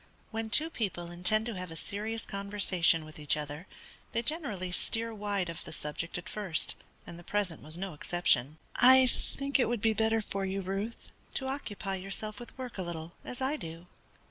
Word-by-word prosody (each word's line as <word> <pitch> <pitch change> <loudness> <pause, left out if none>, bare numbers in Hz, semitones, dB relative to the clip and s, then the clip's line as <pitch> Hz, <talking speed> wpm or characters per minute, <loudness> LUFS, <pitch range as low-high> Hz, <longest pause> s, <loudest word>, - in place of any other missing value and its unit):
When 225 0 -2
two 315 +8 +5
people 180 - -2
intend 180 +5 +3
to 235 - -2
have 180 -1 -4
a 165 - -7
serious 215 +6 -3
conversation 195 -5 +3
with 155 0 -10
each 150 0 +3
other, 150 +4 -5 0.5
they 230 - +1
generally 235 - 0
steer 225 +5 -1
wide 205 -3 -1
of 170 -1 -5
the - - -7
subject 155 +3 -3
at 180 - -7
first, 195 -7 0 0.3
and 170 - -8
the - - -11
present 195 -4 0
was 155 +2 -5
no 190 -1 -3
exception. 150 -3 +2 0.2
"I 260 +1 +9
think 275 +3 0
it 250 - +4
would 240 -1 +1
be 220 +1 +3
better 225 +1 +3
for 200 -2 -2
you, 195 +1 -1
Ruth, 195 +5 -3 0.2
to 265 - +1
occupy 210 -8 -3
yourself 200 +3 -3
with 240 +1 -10
work 250 -5 -5
a - - +1
little, 170 -2 -4
as 250 +1 -3
I 280 +3 +1
do." 165 - -7
200 Hz, 195 wpm, -32 LUFS, 175-225 Hz, 0.5 s, I